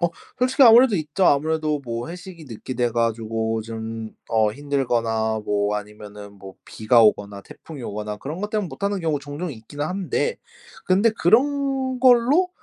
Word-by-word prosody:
어. 175 Hz, -, +2 dB, 0.3 s
솔직히 255 Hz, +2 st, +2 dB
아무래도 235 Hz, -2 st, +7 dB
있죠. 155 Hz, +3 st, 0 dB
아무래도 155 Hz, 0 st, +1 dB
뭐 115 Hz, +1 st, -5 dB
회식이 175 Hz, -1 st, -10 dB
늦게 130 Hz, 0 st, -8 dB
돼 120 Hz, -1 st, 0 dB
가지고 115 Hz, -1 st, -1 dB
좀 110 Hz, 0 st, -6 dB, 0.2 s
어 110 Hz, -1 st, +2 dB
힘들거나 115 Hz, -5 st, -1 dB
뭐 105 Hz, 0 st, 0 dB
아니면은 105 Hz, -1 st, -10 dB
뭐 95 Hz, 0 st, -11 dB
비가 115 Hz, +2 st, +3 dB
오거나 100 Hz, -2 st, +1 dB
태풍이 150 Hz, +4 st, -12 dB
오거나 105 Hz, -1 st, -5 dB
그런 150 Hz, -, -7 dB
것 210 Hz, -, -3 dB
때문에 210 Hz, -2 st, -2 dB
못하는 200 Hz, +3 st, -3 dB
경우 160 Hz, -3 st, -1 dB
종종 145 Hz, +4 st, -6 dB
있기는 130 Hz, +5 st, -7 dB
한데 190 Hz, -, -2 dB, 0.5 s
근데 195 Hz, +5 st, +3 dB
그런 265 Hz, -, +1 dB
걸로 260 Hz, +8 st, +4 dB
145 Hz, 335 characters per minute, -22 LUFS, -, 0.5 s, 아무래도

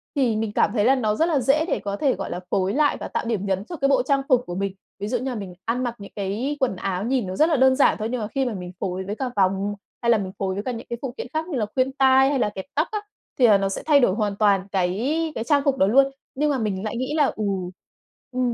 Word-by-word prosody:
thì 255 Hz, -6 st, +2 dB
mình 215 Hz, -1 st, -1 dB
cảm -, -, +2 dB
thấy 210 Hz, -3 st, +2 dB
là 265 Hz, +3 st, +5 dB
nó 215 Hz, -5 st, 0 dB
rất 320 Hz, -, +2 dB
là 325 Hz, -4 st, +1 dB
dễ 275 Hz, +5 st, +2 dB
để -, -, 0 dB
có 200 Hz, -1 st, -4 dB
thể, 275 Hz, 0 st, +2 dB
gọi 195 Hz, -, -5 dB
là, 175 Hz, -, -4 dB
phối 190 Hz, 0 st, +1 dB
lại 295 Hz, +1 st, +2 dB
và -, -, -5 dB
tạo -, -, -3 dB
điểm 220 Hz, -4 st, -1 dB
nhấn 195 Hz, 0 st, -1 dB
cho 345 Hz, -, -7 dB
cái 275 Hz, -3 st, +1 dB
bộ 265 Hz, -3 st, +3 dB
trang 275 Hz, +1 st, +2 dB
phục 250 Hz, -1 st, +4 dB
của 175 Hz, -, -5 dB
mình. 195 Hz, 0 st, -2 dB, 0.3 s
Ví 205 Hz, -, -3 dB
dụ 245 Hz, +3 st, 0 dB
như 255 Hz, +3 st, -3 dB
là 250 Hz, -, -4 dB
mình 195 Hz, -4 st, -6 dB
ăn 245 Hz, +2 st, -1 dB
mặc 240 Hz, -1 st, -2 dB
những 200 Hz, -1 st, -11 dB
cái 215 Hz, +9 st, -2 dB
quần 260 Hz, -7 st, +1 dB
áo 185 Hz, 0 st, -3 dB
nhìn 245 Hz, -2 st, 0 dB
nó 185 Hz, -, -4 dB
rất 310 Hz, -, +4 dB
là 315 Hz, -, +3 dB
đơn 260 Hz, 0 st, +5 dB
giản 280 Hz, -, +4 dB
thôi, 215 Hz, -, -1 dB
nhưng 250 Hz, -2 st, -2 dB
mà 210 Hz, -, -2 dB
khi 270 Hz, +4 st, -1 dB
mà 245 Hz, -, -2 dB
mình 180 Hz, -2 st, -6 dB
phối 185 Hz, 0 st, -3 dB
với 205 Hz, -, -4 dB
cả 265 Hz, -, -3 dB
vòng, 195 Hz, +1 st, +1 dB, 0.3 s
hay 235 Hz, -, 0 dB
là 230 Hz, -, +5 dB
mình 190 Hz, -3 st, -4 dB
phối 190 Hz, -1 st, -1 dB
với 200 Hz, +2 st, -4 dB
cả 255 Hz, -, -2 dB
những 230 Hz, -2 st, -7 dB
cái 235 Hz, -, -3 dB
phụ 265 Hz, -3 st, -4 dB
kiện -, -, -5 dB
khác 315 Hz, +1 st, -1 dB
như 315 Hz, -7 st, -3 dB
là 220 Hz, -, 0 dB
khuyên 260 Hz, +1 st, +2 dB
tai 265 Hz, 0 st, +4 dB
hay 280 Hz, -2 st, 0 dB
là 210 Hz, -, +2 dB
kẹp 190 Hz, -2 st, -7 dB
tóc 305 Hz, +4 st, +2 dB
á, 425 Hz, -, -1 dB, 0.4 s
thì 245 Hz, -, +7 dB
là 210 Hz, -3 st, +6 dB
nó 195 Hz, 0 st, 0 dB
sẽ 195 Hz, -, -4 dB
thay 295 Hz, -2 st, +5 dB
đổi 215 Hz, -7 st, +3 dB
hoàn 210 Hz, -2 st, -1 dB
toàn 200 Hz, -2 st, +2 dB
cái 240 Hz, -, 0 dB
cái 225 Hz, -, -2 dB
trang 285 Hz, +3 st, +3 dB
phục 275 Hz, -2 st, +2 dB
đó 190 Hz, -, +4 dB
luôn. 270 Hz, +5 st, +4 dB, 0.2 s
Nhưng 295 Hz, +2 st, +1 dB
mà 280 Hz, -, 0 dB
mình 205 Hz, -5 st, -2 dB
lại 220 Hz, +1 st, -3 dB
nghĩ 255 Hz, +4 st, -2 dB
là, 300 Hz, -2 st, +4 dB
ừ 215 Hz, -, -3 dB, 0.9 s
ừ, 255 Hz, -, -4 dB
235 Hz, 310 wpm, -23 LUFS, 200-270 Hz, 0.9 s, thì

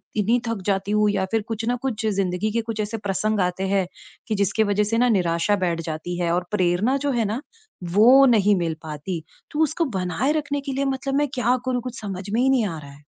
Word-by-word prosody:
इतनी 220 Hz, +4 st, +2 dB
थक 230 Hz, -4 st, -2 dB
जाती 195 Hz, +1 st, 0 dB
हूँ। 210 Hz, 0 st, +3 dB
या 195 Hz, -2 st, 0 dB
फ़िर 225 Hz, -1 st, +2 dB
कुछ 225 Hz, 0 st, -3 dB
न 245 Hz, -, +1 dB
कुछ 225 Hz, -5 st, -2 dB
ज़िंदगी 195 Hz, 0 st, 0 dB
के 230 Hz, +2 st, 0 dB
कुछ 225 Hz, -1 st, -5 dB
ऐसे 210 Hz, +2 st, -3 dB
प्रसंग 205 Hz, +1 st, -1 dB
आते 180 Hz, +2 st, -1 dB
हैं 195 Hz, -1 st, +1 dB, 0.4 s
कि 215 Hz, -, 0 dB
जिसकी 200 Hz, +2 st, +1 dB
वज़ह 205 Hz, 0 st, +1 dB
से 225 Hz, +2 st, 0 dB
न 245 Hz, -1 st, +4 dB
निराशा 175 Hz, +2 st, +1 dB
बैठ 170 Hz, -1 st, -1 dB
जाती 165 Hz, +3 st, -4 dB
है 170 Hz, -1 st, 0 dB
और 180 Hz, 0 st, 0 dB
प्रेरणा 205 Hz, +6 st, +2 dB
जो 285 Hz, 0 st, -1 dB
है 235 Hz, -3 st, +1 dB
ना, 220 Hz, +7 st, -2 dB, 0.4 s
वो 230 Hz, +10 st, +6 dB
नहीं 210 Hz, -5 st, +4 dB
मिल 170 Hz, -2 st, -1 dB
पाती। 160 Hz, +2 st, -5 dB, 0.3 s
तो 300 Hz, -, -3 dB
उसको 315 Hz, +2 st, 0 dB
बनाए 180 Hz, -, 0 dB
रखने 290 Hz, -2 st, -2 dB
के 275 Hz, -1 st, -4 dB
लिए 275 Hz, +1 st, -1 dB
मतलब 270 Hz, 0 st, -2 dB
मैं 290 Hz, +1 st, +2 dB
क्या 250 Hz, -1 st, +2 dB
करूँ? 250 Hz, -1 st, 0 dB
कुछ 250 Hz, 0 st, -7 dB
समझ 195 Hz, -2 st, -6 dB
में 225 Hz, +4 st, +1 dB
ही 265 Hz, -, +3 dB
नहीं 255 Hz, -4 st, +3 dB
आ 165 Hz, -4 st, -5 dB
रहा 140 Hz, -2 st, -11 dB
है। 145 Hz, +1 st, -17 dB
210 Hz, 235 wpm, -23 LUFS, 185-245 Hz, 0.4 s, वो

